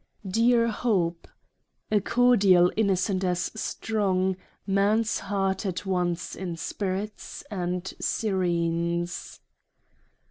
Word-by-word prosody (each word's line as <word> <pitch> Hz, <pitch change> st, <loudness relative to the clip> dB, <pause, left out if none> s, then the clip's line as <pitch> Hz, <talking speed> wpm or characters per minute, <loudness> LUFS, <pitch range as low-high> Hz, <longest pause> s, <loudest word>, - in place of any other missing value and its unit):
Dear 230 Hz, +4 st, +3 dB
Hope, 185 Hz, -7 st, 0 dB, 0.6 s
A 210 Hz, -, +4 dB
cordial 200 Hz, -7 st, +5 dB
innocent 195 Hz, -2 st, +1 dB
as 180 Hz, -1 st, 0 dB
strong 195 Hz, -4 st, 0 dB, 0.3 s
Man's 210 Hz, +3 st, +2 dB
heart 195 Hz, -1 st, -1 dB
at 190 Hz, -1 st, -3 dB
once 180 Hz, -2 st, -1 dB
inspirits 190 Hz, +3 st, -4 dB
— -, -, -33 dB
and 180 Hz, -2 st, -2 dB, 0.2 s
serenes. 170 Hz, -3 st, -1 dB
190 Hz, 85 wpm, -26 LUFS, 180-210 Hz, 0.6 s, cordial